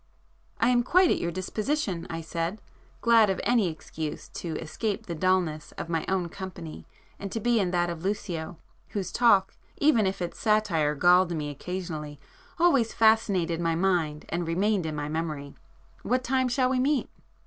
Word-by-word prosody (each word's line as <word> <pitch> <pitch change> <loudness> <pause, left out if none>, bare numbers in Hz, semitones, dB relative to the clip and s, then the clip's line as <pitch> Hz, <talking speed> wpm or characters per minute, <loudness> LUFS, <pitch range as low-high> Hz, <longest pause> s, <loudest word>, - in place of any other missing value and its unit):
"I 230 - +3
am 245 -1 +4
quite 360 +8 +4
at - - +1
your 170 - -1
disposition"—I 185 - -2
said, 165 +5 -3 0.4
glad 230 -3 +5
of 190 - -1
any 235 -5 +3
excuse 155 -1 -6
to 165 -3 -5
escape 200 +6 -3
the 170 - -4
dullness 170 -3 0
of - - -6
my 165 -2 -1
own 190 -2 0
company 180 -3 -8 0.3
and 200 -1 -6
to 225 - -2
be 235 +1 +2
in 190 -3 +1
that 175 -1 +1
of 170 -2 -5
Lucio, 175 -5 -3 0.4
whose 190 -4 -3
talk, 200 -4 +4 0.2
even 275 -9 +4
if 195 +1 -2
its 175 -1 -5
satire 195 -9 +2
galled 175 +2 +4
me 150 -2 -3
occasionally, 155 -2 -6 0.4
always 280 -10 +3
fascinated 200 -7 +3
my 165 -1 +1
mind 165 -4 0
and 170 0 -2
remained 190 +1 +1
in 155 - -3
my 145 0 -3
memory—"What 160 - -4
time 260 0 +1
shall 255 +1 +1
we 260 - +1
meet?" 275 +1 +1
185 Hz, 165 wpm, -27 LUFS, 165-220 Hz, 0.4 s, glad